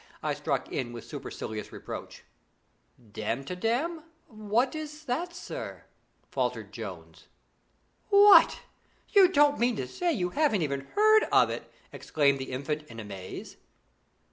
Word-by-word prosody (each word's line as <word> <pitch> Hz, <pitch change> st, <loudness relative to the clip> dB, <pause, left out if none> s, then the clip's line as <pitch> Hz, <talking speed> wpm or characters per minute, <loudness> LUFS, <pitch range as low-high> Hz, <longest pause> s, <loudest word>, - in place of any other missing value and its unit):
I -, -, 0 dB
struck -, -, -2 dB
in 120 Hz, -1 st, -3 dB
with 115 Hz, -, -8 dB
supercilious 110 Hz, -1 st, -6 dB
reproach. -, -, -8 dB, 0.8 s
'Damtidam! 180 Hz, -, -2 dB, 0.3 s
What 220 Hz, +3 st, 0 dB
is 310 Hz, 0 st, -7 dB
that, 325 Hz, +8 st, -2 dB
sir?' 430 Hz, +8 st, -7 dB, 0.5 s
faltered -, -, -2 dB
Jones. -, -, -9 dB, 0.8 s
'What! 405 Hz, 0 st, +7 dB, 0.5 s
you 390 Hz, -2 st, +7 dB
don't 290 Hz, -5 st, +3 dB
mean 240 Hz, 0 st, +2 dB
to 130 Hz, -, -4 dB
say 350 Hz, -, -1 dB
you 180 Hz, -, -1 dB
haven't 255 Hz, -, +2 dB
even 140 Hz, -2 st, -3 dB
heard 435 Hz, +1 st, +6 dB
of -, -, +5 dB
it?' -, -, -7 dB, 0.4 s
cried 140 Hz, -3 st, +4 dB
the 130 Hz, -, -6 dB
Infant 150 Hz, +4 st, -3 dB
in 115 Hz, 0 st, -10 dB
amaze. 95 Hz, -4 st, -8 dB
215 Hz, 125 wpm, -28 LUFS, -, 0.8 s, What